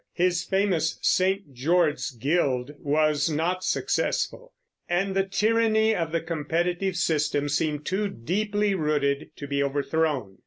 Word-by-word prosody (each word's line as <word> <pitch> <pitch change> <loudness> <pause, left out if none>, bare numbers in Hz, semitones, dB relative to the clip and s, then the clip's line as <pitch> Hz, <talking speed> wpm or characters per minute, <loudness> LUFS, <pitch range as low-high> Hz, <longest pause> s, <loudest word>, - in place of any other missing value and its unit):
His 180 0 +1
famous 190 -5 0
St. 190 -5 +1
George's 155 +5 +1
Guild 135 0 0
was 150 0 +1
not 170 +4 -1
successful, - - -1 0.4
and 190 +2 0
the 195 - +4
tyranny 220 +2 +2
of 165 -5 -2
the 165 0 0
competitive 175 +3 -1
system 150 -4 +1
seemed 150 0 -1
too 205 +2 0
deeply 205 - -1
rooted 150 -4 0
to 145 - -7
be 140 0 -1
overthrown. 140 - -1
165 Hz, 125 wpm, -26 LUFS, 145-190 Hz, 0.4 s, the